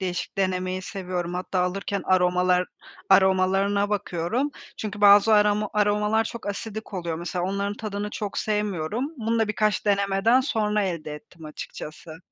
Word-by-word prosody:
değişik 185 +1 -4
denemeyi 185 -1 -1
seviyorum. 180 -2 -4
Hatta 180 0 -2
alırken 195 +2 -2
aromalar 180 0 +3 0.4
aromalarına 195 +1 +3
bakıyorum. 205 - -1 0.3
Çünkü 215 -1 -5
bazı 205 +1 +7
aroma 210 0 +3
aromalar 210 +1 +2
çok 235 +1 -7
asidik 215 +1 -5
oluyor. 170 -3 -3
Mesela, 175 +1 -3
onların 200 +2 -2
tadını 210 -1 -4
çok 205 -2 -4
sevmiyorum. 210 0 -1
Bunu 230 -1 -1
da 225 -1 +1
birkaç 215 0 0
denemeden 200 +4 +3
sonra 215 -5 0
elde 170 -5 -3
ettim 160 +2 -13
açıkçası. 155 +1 -9
200 Hz, 135 wpm, -25 LUFS, 180-210 Hz, 0.4 s, bazı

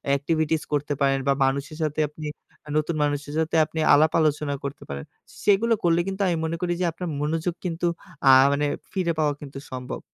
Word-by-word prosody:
activities 155 +2 0
করতে 145 0 0
পারেন 135 0 +3
বা 140 - +5
মানুষের 140 +3 -2
সাথে 155 0 -2
আপনি 155 +1 -9 0.4
আ - - -19
নতুন 155 +2 0
মানুষের 145 0 -2
সাথে 160 0 0
আপনি 160 +1 -6
আলাপ-আলোচনা 150 -1 +3
করতে 140 0 -6
পারেন। 70 0 -5 0.4
সেগুলো 215 +3 +4
করলে 170 -1 +3
কিন্তু 195 +1 -3
আমি 175 -2 +1
মনে 165 +1 -2
করি 175 -1 0
যে - - +2
আপনার 175 +2 -6
মনোযোগ 160 +3 -1
কিন্তু 170 -1 -2 0.4
আ - - +9 0.2
মানে 145 +1 +1 0.3
ফিরে 185 -3 0
পাওয়া 150 -2 +2
কিন্তু 140 -2 -9
সম্ভব। 125 -1 -5
155 Hz, 185 wpm, -25 LUFS, 145-165 Hz, 0.4 s, আ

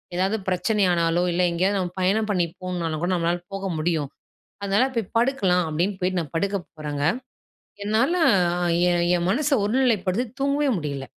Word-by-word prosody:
ஏதாவது 190 +4 +1
பிரச்சனை 205 +3 +1
ஆனாலோ! 170 0 +1
இல்ல 180 +1 +1
எங்கேயாவது 190 +4 +1
நம்ம 180 -1 -3
பயணம் 210 +4 +1
பண்ணி 180 -3 +2 0.2
போணுனாலும் 170 -4 -3
கூட, 180 - 0
நம்மளால 175 +1 0
போக 195 0 -4
முடியும். 155 -3 -1 0.5
அதனால 200 +6 +2
போய் 225 -4 0
படுக்கலாம், 200 -8 +2
அப்பிடின்னு 185 +5 -1
போயிட்டு 180 0 0
நான் 150 -2 -9
படுக்க 200 +4 0 0.2
போறங்க. 145 -2 -4 0.8
என்னால 220 +11 +2 0.8
என் 175 0 +2
என் 170 +1 -1
மனச 290 +7 +1
ஒருநிலைப்படுத்தி 225 -2 +1 0.2
தூங்கவே 280 +1 +1
முடியல. 140 -4 -4
185 Hz, 150 wpm, -24 LUFS, 170-210 Hz, 0.8 s, பண்ணி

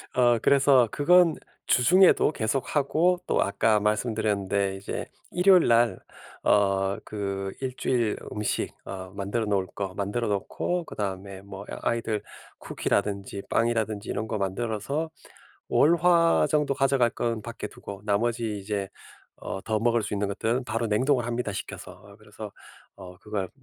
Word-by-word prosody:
어 120 -2 +4
그래서 135 -3 +5
그건 165 +4 +4 0.3
주중에도 175 +5 +5
계속 125 +3 -2
하고 160 +5 +2
또 - - +2
아까 105 +2 +2
말씀드렸는데 105 -2 0
이제 95 - -5 0.3
일요일 180 0 +5
날 120 0 +3 0.4
어 100 -1 +2
그 100 -2 -4
1 130 -1 -2
주일 120 -4 0 0.2
음식 105 0 -2
어 95 -1 -7
만들어 100 +3 -2
놓을 100 -3 0
거 95 -2 -3
만들어 105 +4 -2
놓고 105 - -2
그다음에 95 -3 -5
뭐 100 0 -9
애 - - -4
아이들 115 -3 -1 0.4
쿠키라든지 100 -1 -2
빵이라든지 110 -3 0
이런 110 - -2
거 110 - -2
만들어서 110 - -2 0.6
월, 160 +4 +5
화 170 -1 +4
정도 150 -3 +1
가져갈 135 -3 +2
건 115 -3 -2
밖에 115 -1 -6
두고 100 -1 -10
나머지 110 +1 0
이제 100 -1 -3 0.5
어 95 - -6
더 110 +1 -1
먹을 120 +1 +2
수 105 - -4
있는 100 0 -1
것들은 115 +5 -1
바로 115 0 -1
냉동을 125 +4 +2
합니다, 120 -2 -2
식혀서. - - -7
어 100 +1 -16
그래서 105 0 -10 0.4
어 90 -2 -11
그걸 100 -2 -4
110 Hz, 300 characters per minute, -26 LUFS, 100-125 Hz, 0.6 s, 그래서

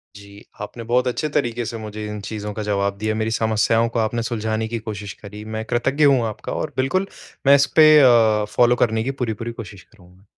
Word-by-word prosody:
जी, 100 +1 -14 0.2
आपने 120 - -7
बहुत 125 +2 +1
अच्छे 150 +5 -2
तरीके 120 -5 -1
से 115 - -5
मुझे 110 -1 -7
इन 105 0 -6
चीज़ों 105 0 -6
का 110 - -5
जवाब 100 -1 -1
दिया, 110 +1 -2
मेरी 110 0 -1
समस्याओं 110 +1 +1
को 115 - -2
आपने 115 +1 -1
सुलझाने 110 -1 -2
की 115 +1 -4
कोशिश 105 -2 -7
करी। 105 +1 -11
मैं 110 - -3
कृतज्ञ 130 +5 0
हूँ 140 -3 +5
आपका 110 - -7
और 150 - -4
बिल्कुल, 185 +9 0 0.4
मैं 140 - +8
इसपे 140 +3 +5
अ, 115 -5 +4
फ़ॉलो 120 0 +4
करने 110 -1 0
की 135 - -2
पूरी-पूरी 115 0 -3
कोशिश 100 -3 -12
करूँगा। 95 -2 -22
110 Hz, 200 wpm, -21 LUFS, 105-120 Hz, 0.4 s, मैं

